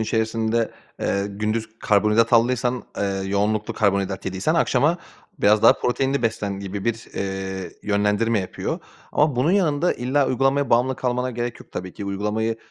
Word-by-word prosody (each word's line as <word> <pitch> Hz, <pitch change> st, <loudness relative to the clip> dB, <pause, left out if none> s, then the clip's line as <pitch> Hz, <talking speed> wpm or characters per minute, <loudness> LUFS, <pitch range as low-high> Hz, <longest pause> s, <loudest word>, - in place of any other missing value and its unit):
içerisinde, 110 Hz, +1 st, 0 dB, 0.3 s
eee, 100 Hz, 0 st, 0 dB
gündüz 110 Hz, +2 st, -3 dB
karbonhidrat 105 Hz, +3 st, +3 dB
aldıysan, 125 Hz, +1 st, +2 dB, 0.2 s
eee, -, -, +1 dB, 0.2 s
yoğunluklu 105 Hz, +2 st, 0 dB
karbonhidrat 100 Hz, -2 st, 0 dB
yediysen 95 Hz, -, 0 dB
akşama 160 Hz, +1 st, +2 dB, 0.4 s
biraz 105 Hz, +1 st, +4 dB
daha -, -, +9 dB
proteinli 135 Hz, +1 st, 0 dB
beslen 100 Hz, -3 st, -1 dB
gibi 100 Hz, 0 st, -5 dB
bir, 115 Hz, -1 st, -1 dB
eee, 95 Hz, -1 st, -4 dB
yönlendirme 105 Hz, +2 st, +1 dB
yapıyor. 95 Hz, -, -4 dB, 0.3 s
Ama 150 Hz, -4 st, +2 dB
bunun 130 Hz, +7 st, +2 dB
yanında 175 Hz, -4 st, +2 dB
illa 130 Hz, +3 st, +1 dB
uygulamaya 135 Hz, +2 st, +1 dB
bağımlı 125 Hz, +2 st, +3 dB
kalmana 125 Hz, 0 st, -1 dB
gerek 120 Hz, 0 st, -4 dB
yok -, -, -16 dB
tabii 90 Hz, 0 st, -5 dB
ki. 100 Hz, -, -7 dB
Uygulamayı 105 Hz, +3 st, -1 dB
110 Hz, 145 wpm, -23 LUFS, 100-125 Hz, 0.4 s, daha